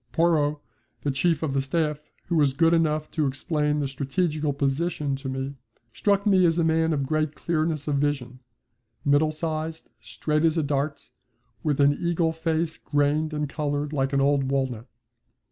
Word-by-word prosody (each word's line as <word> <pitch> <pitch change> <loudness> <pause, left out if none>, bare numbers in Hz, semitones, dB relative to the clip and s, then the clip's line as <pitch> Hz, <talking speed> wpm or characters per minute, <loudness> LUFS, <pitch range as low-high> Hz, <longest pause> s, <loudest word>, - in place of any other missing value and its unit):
Porro, 155 -3 +2 0.4
the 145 - +1
Chief 160 +3 +1
of 145 -4 -1
the 135 - +2
Staff, 150 +1 -1 0.3
who 170 - -1
was 145 -4 +3
good 165 +2 +4
enough 155 -2 +1
to 155 -3 0
explain 150 +2 0
the 145 -2 0
strategical 150 +3 -1
position 140 +1 -1
to 135 0 -6
me, 135 +1 -3 0.4
struck 200 0 +1
me 190 -3 +5
as 165 -1 +3
a 170 - +3
man 160 0 +2
of 140 -3 0
great 155 +1 -1
clearness 155 -2 -1
of 145 -2 +1
vision, 135 -3 -2 0.7
middle 145 +2 +4
sized, 160 +1 -4
straight 150 0 -2
as 165 0 +3
a 160 - +2
dart, 140 0 -2 0.5
with 150 -3 0
an 140 0 +5
eagle 170 -1 +1
face 160 0 -1
grained 145 +2 +1
and 150 -1 -2
coloured 145 0 -2
like 135 -2 0
an 140 -1 +2
old 140 0 +2
walnut. 130 -4 -1
150 Hz, 170 wpm, -25 LUFS, 140-160 Hz, 0.7 s, me